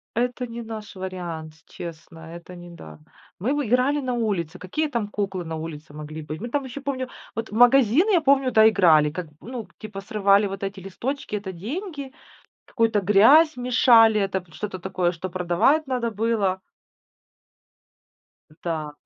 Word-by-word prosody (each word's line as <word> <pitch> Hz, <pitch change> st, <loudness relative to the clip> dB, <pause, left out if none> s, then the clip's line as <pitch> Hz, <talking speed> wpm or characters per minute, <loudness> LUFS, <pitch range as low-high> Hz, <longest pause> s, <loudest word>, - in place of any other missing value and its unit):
Это 245 Hz, +1 st, -1 dB
не 230 Hz, 0 st, -7 dB
наш 220 Hz, -2 st, -8 dB
вариант, 175 Hz, -4 st, -6 dB
честно, 165 Hz, -1 st, -9 dB, 0.2 s
это 175 Hz, +1 st, -11 dB
не 175 Hz, 0 st, -11 dB
да. 75 Hz, -, -12 dB, 0.4 s
Мы 250 Hz, +9 st, 0 dB
бы 290 Hz, -5 st, -1 dB
играли 260 Hz, +5 st, +2 dB
на 255 Hz, -1 st, -2 dB
улице. 190 Hz, -8 st, -2 dB
Какие 300 Hz, -, -2 dB
там 235 Hz, -6 st, -2 dB
куклы 195 Hz, -4 st, -3 dB
на 160 Hz, 0 st, -5 dB
улице 155 Hz, -1 st, -8 dB
могли 155 Hz, +1 st, -7 dB
быть? 155 Hz, +3 st, -7 dB
Мы 240 Hz, -, -5 dB
там 285 Hz, +2 st, -1 dB
ещё 260 Hz, +2 st, -7 dB
помню 260 Hz, -2 st, -3 dB, 0.3 s
вот 225 Hz, 0 st, -4 dB
в -, -, -6 dB
магазин, 255 Hz, -, +5 dB
я 350 Hz, -5 st, +4 dB
помню, 270 Hz, -3 st, +3 dB
да, 220 Hz, 0 st, +6 dB
играли. 160 Hz, -8 st, +4 dB
Как, 175 Hz, 0 st, -5 dB
ну, 235 Hz, -2 st, -6 dB
к -, -, -27 dB
типа, 215 Hz, -2 st, -8 dB
срывали 200 Hz, 0 st, +3 dB
вот 195 Hz, 0 st, -7 dB
эти 195 Hz, 0 st, -4 dB
листочки- 235 Hz, +4 st, -4 dB
это 190 Hz, -2 st, -6 dB
деньги. 280 Hz, -, -6 dB, 0.5 s
Какую-то 225 Hz, -4 st, +1 dB
грязь 250 Hz, -, +6 dB
мешали, 235 Hz, -3 st, +5 dB
это 195 Hz, -1 st, -1 dB
п 170 Hz, -3 st, -24 dB
что-то 185 Hz, +2 st, -6 dB
такое, 180 Hz, -1 st, -1 dB
что 185 Hz, +2 st, -6 dB
продавать 185 Hz, -, +1 dB
надо 245 Hz, -3 st, -1 dB
было. 210 Hz, -3 st, 0 dB, 1.9 s
М, 155 Hz, -, -20 dB
да. 155 Hz, -3 st, -3 dB
210 Hz, 170 wpm, -24 LUFS, 175-250 Hz, 1.9 s, да